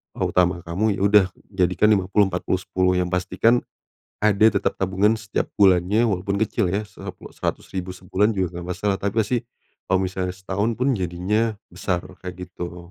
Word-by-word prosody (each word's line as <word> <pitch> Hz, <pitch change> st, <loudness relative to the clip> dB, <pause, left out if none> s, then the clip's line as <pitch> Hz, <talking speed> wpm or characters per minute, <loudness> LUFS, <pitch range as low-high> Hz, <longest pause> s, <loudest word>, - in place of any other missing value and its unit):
eee, -, -, -2 dB
utama 90 Hz, -1 st, +2 dB
kamu 100 Hz, +5 st, 0 dB
ya -, -, -4 dB
udah 100 Hz, -1 st, +6 dB, 0.3 s
jadikan 95 Hz, +2 st, +3 dB
50-40-10, 95 Hz, -1 st, +1 dB
yang 90 Hz, -, 0 dB
pasti 90 Hz, +1 st, -2 dB
kan, 120 Hz, +4 st, +4 dB, 0.6 s
ada 105 Hz, 0 st, +5 dB
tetap 100 Hz, -3 st, 0 dB
tabungan 95 Hz, +3 st, +2 dB
setiap 110 Hz, -1 st, -2 dB
bulannya 100 Hz, +4 st, +4 dB
walaupun 100 Hz, +1 st, -1 dB
kecil 110 Hz, 0 st, 0 dB
ya 100 Hz, -, +1 dB
se -, -, -22 dB, 0.4 s
Rp100.000 90 Hz, -1 st, -4 dB
sebulan 95 Hz, +4 st, 0 dB
juga 90 Hz, -4 st, -2 dB
nggak 85 Hz, -, -8 dB
masalah 100 Hz, -2 st, 0 dB
tapi 100 Hz, 0 st, -2 dB
pasti, 115 Hz, +3 st, +1 dB, 0.5 s
kalo 95 Hz, -1 st, +4 dB
misalnya 95 Hz, 0 st, -2 dB
setahun 95 Hz, +4 st, -1 dB
pun 130 Hz, +2 st, +2 dB
jadinya 95 Hz, +5 st, 0 dB, 0.2 s
besar, 90 Hz, 0 st, -2 dB, 0.2 s
kayak 90 Hz, 0 st, -7 dB
gitu. 90 Hz, -1 st, -8 dB
95 Hz, 160 wpm, -23 LUFS, 90-105 Hz, 0.6 s, udah